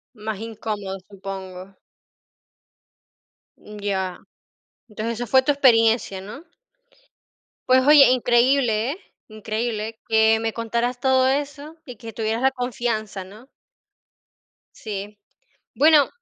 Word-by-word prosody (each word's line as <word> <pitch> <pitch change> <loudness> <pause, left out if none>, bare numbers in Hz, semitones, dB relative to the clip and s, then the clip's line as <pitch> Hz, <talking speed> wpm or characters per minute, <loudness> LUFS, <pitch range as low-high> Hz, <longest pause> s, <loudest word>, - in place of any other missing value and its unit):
Más 215 -1 -5
incómodo, 210 -3 -5
supongo. 190 -1 -9 1.8
Mm, 210 0 -12
ya. 190 -3 -3 0.7
Entonces 220 +2 -4
esa 240 +1 -5
fue 260 +4 +5
tu 290 - +1
experiencia, 225 -7 +3
¿no? 215 - -10 1.2
Pues, 255 0 +5
oye, 295 -2 +8
increíble, 245 -1 +2
¿eh? 335 - -6 0.3
Increíble 220 +1 -4
que 220 0 +4
me 225 -1 -2
contaras 235 +2 -2
todo 260 0 +3
eso 290 +3 -3
y 250 -4 -10
que 225 0 -10
tuvieras 225 +2 -2
la 265 - +4
confianza, 235 -6 -3
¿no? 215 +8 -15 1.3
Sí. 205 -1 -7 0.6
Bueno, 300 -2 +5
225 Hz, 105 wpm, -22 LUFS, 210-255 Hz, 1.8 s, oye